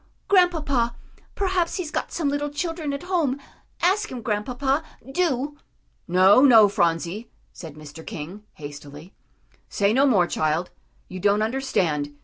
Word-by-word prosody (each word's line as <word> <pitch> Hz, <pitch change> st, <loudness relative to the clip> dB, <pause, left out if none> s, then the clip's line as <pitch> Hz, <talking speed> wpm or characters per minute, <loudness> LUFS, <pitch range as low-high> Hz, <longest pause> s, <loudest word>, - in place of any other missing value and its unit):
"Grandpapa, 305 Hz, -11 st, +2 dB, 0.4 s
perhaps 370 Hz, -3 st, 0 dB
he's 345 Hz, -5 st, -4 dB
got -, -, -3 dB
some 325 Hz, -4 st, -1 dB
little 290 Hz, +1 st, -1 dB
children 315 Hz, 0 st, -3 dB
at 280 Hz, +3 st, -5 dB
home; 330 Hz, -7 st, 0 dB, 0.4 s
ask 400 Hz, +4 st, +2 dB
him, 245 Hz, -3 st, -6 dB
Grandpapa, 250 Hz, +6 st, -1 dB, 0.3 s
do." 290 Hz, -3 st, -1 dB, 0.5 s
"No, 185 Hz, +6 st, +6 dB
no, 225 Hz, -6 st, +8 dB
Phronsie," 175 Hz, +3 st, -1 dB, 0.2 s
said 160 Hz, -4 st, -10 dB
Mr. 155 Hz, +1 st, -11 dB
King, 170 Hz, +8 st, -7 dB
hastily. 145 Hz, +3 st, -10 dB, 0.6 s
"Say 200 Hz, +1 st, +1 dB
no 275 Hz, +3 st, +4 dB
more, 200 Hz, -9 st, +4 dB
child; 155 Hz, +1 st, -1 dB, 0.4 s
you 185 Hz, -, -8 dB
don't 205 Hz, +3 st, +2 dB
understand. 180 Hz, -, -1 dB
235 Hz, 130 wpm, -24 LUFS, 175-290 Hz, 0.6 s, no